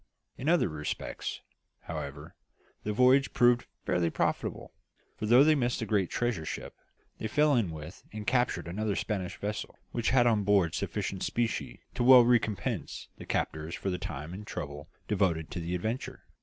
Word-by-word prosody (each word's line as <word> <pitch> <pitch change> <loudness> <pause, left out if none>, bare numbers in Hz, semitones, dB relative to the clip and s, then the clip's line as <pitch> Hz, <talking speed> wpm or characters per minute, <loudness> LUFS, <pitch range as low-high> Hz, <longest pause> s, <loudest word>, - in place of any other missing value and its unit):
In 140 - -2
other 175 0 +4
respects, 75 -3 -4 0.4
however, 70 +2 -6 0.5
the 105 - -2
voyage 130 +4 +4
proved 120 0 +4 0.2
fairly 85 -2 +1
profitable; - - -2 0.4
for 105 - -4
though 120 +5 +7
they 155 +1 +5
missed 125 -4 +1
the 115 - -3
great 100 -4 +1
treasure 120 -8 -1
ship, - - -5 0.5
they 110 - -2
fell 150 +5 +3
in 115 -7 +2
with 80 +3 -8
and 105 0 -6
captured 125 -6 +1
another 105 +3 -1
Spanish 95 -4 -3
vessel 105 +1 -4
which 120 -2 0
had 125 -1 +4
on 110 -4 +3
board 95 -5 +3
sufficient - - -3
specie 115 -2 -2
to 125 - -1
well 125 -1 +9
recompense 115 -4 0
the - - -9
captors 80 +2 -2
for 95 - -2
the 90 - -3
time 75 +3 -6
and 105 +3 -8
trouble 75 -1 -6 0.2
devoted 90 -6 0
to 90 - -4
the 85 +1 -2
adventure. 110 +8 -4
105 Hz, 170 wpm, -30 LUFS, 85-120 Hz, 0.5 s, well